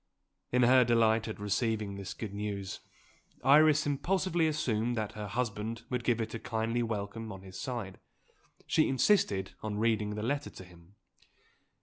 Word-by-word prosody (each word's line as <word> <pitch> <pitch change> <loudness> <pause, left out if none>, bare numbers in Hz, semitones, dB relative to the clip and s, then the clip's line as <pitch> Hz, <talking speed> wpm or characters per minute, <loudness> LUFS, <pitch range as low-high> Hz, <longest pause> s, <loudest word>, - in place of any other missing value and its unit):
In 125 0 +3
her 130 +1 +6
delight 115 -1 +3
at 110 - -6
receiving 105 0 -1
this 100 -1 -6
good 105 -3 -6
news 100 -2 -4 0.6
Iris 150 +3 +6
impulsively 170 +3 +1
assumed 120 -6 0
that 110 -2 -2
her 105 -1 -6
husband 115 0 -3
would 125 -1 -1
give 120 -1 +1
it 110 -1 -3
a 115 - -4
kindly 115 +2 -1
welcome 110 0 -4
on 95 -1 -9
his 95 -1 -9
side; 115 -7 -5 0.7
she 155 - +2
insisted 125 - +2
on 105 -1 -3
reading 110 -1 +1
the 105 - -4
letter 140 +5 -1
to - - -11
him. 90 +1 -18
115 Hz, 155 wpm, -31 LUFS, 105-125 Hz, 0.7 s, her